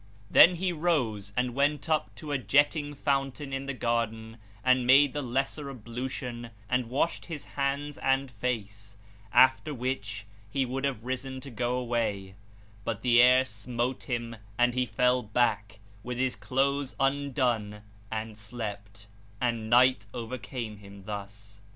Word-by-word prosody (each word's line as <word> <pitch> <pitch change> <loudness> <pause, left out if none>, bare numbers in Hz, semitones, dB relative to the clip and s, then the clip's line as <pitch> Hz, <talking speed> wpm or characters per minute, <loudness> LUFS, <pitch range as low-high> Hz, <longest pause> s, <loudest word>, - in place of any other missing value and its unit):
Then 175 +1 +8
he 180 +1 -1
rose 125 - 0
and 125 -1 +1
went 145 +3 +1
up 155 -1 0
to 150 - -7
a 140 - +1
jetting 145 +2 +2
fountain 135 0 -1
in 135 +1 -3
the 140 - -2
garden 115 -2 -2 0.3
and 130 -1 +3
made 135 +1 +6
the 145 - -2
lesser 135 +3 -2
ablution 120 0 -5 0.2
and 125 0 0
washed 140 +6 0
his 160 -4 -6
hands 140 +1 -2
and 135 0 +1
face, 105 -3 -4 0.3
after 130 +3 +4
which 110 -5 -3 0.2
he 135 +4 0
would 135 +2 -2
have 130 -6 -2
risen 130 +1 -4
to 140 - -9
go 120 +2 -1
away; 115 -6 -2 0.5
but 110 -1 -3
the 120 -1 +6
air 125 +1 +6
smote 120 +5 -3
him 115 -2 -3 0.2
and 120 0 +3
he 125 0 0
fell 125 +1 +2
back, 110 -1 0 0.2
with 125 +2 -5
his 130 0 0
clothes 140 +1 0
undone 125 -7 0 0.3
and 110 -1 -5
slept, 105 -2 -7 0.3
and 115 -2 -1
night 120 -3 +5
overcame 115 -2 -5
him 100 -1 -13
thus. 105 +1 -8
125 Hz, 145 wpm, -29 LUFS, 110-135 Hz, 0.5 s, Then